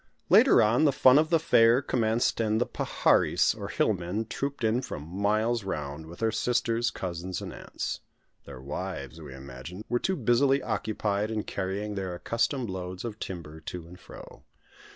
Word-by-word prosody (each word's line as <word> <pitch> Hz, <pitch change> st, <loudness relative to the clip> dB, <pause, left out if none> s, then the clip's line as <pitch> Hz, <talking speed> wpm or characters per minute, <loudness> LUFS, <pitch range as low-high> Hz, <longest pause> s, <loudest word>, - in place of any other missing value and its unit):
Later -, -, +7 dB
on, 120 Hz, +8 st, +3 dB
the 145 Hz, -, +5 dB
fun 130 Hz, +1 st, +6 dB
of 155 Hz, 0 st, +1 dB
the 165 Hz, -, +5 dB
fair 120 Hz, -7 st, +5 dB
commenced, 115 Hz, -4 st, 0 dB
and 110 Hz, 0 st, +1 dB
the 125 Hz, -, +2 dB
paharis, -, -, +2 dB
or -, -, -6 dB
hill 110 Hz, -, +1 dB
men, 95 Hz, +4 st, -3 dB
trooped 140 Hz, +3 st, -4 dB
in 115 Hz, +3 st, +2 dB
from 75 Hz, -, -6 dB
miles 105 Hz, +7 st, 0 dB
round, 75 Hz, -4 st, -5 dB
with 85 Hz, +2 st, -11 dB
their 110 Hz, 0 st, +2 dB
sisters, 120 Hz, -1 st, +1 dB
cousins, 90 Hz, 0 st, -5 dB
and -, -, -7 dB
aunts. -, -, -5 dB, 0.5 s
Their 70 Hz, -3 st, -10 dB
wives, 75 Hz, 0 st, -6 dB
we 70 Hz, -4 st, -9 dB
imagined, 70 Hz, +8 st, -9 dB
were 120 Hz, +1 st, +1 dB
too 190 Hz, +7 st, 0 dB
busily 135 Hz, 0 st, +2 dB
occupied 105 Hz, -1 st, -1 dB
in 110 Hz, -1 st, -2 dB
carrying 100 Hz, +2 st, -3 dB
their 95 Hz, -3 st, -4 dB
accustomed 115 Hz, +6 st, -1 dB
loads 90 Hz, +2 st, -5 dB
of 110 Hz, -2 st, -6 dB
timber 80 Hz, -4 st, -7 dB
to 85 Hz, +2 st, -7 dB
and 90 Hz, +2 st, -13 dB
fro. -, -, -12 dB
105 Hz, 175 wpm, -28 LUFS, 90-120 Hz, 0.5 s, Later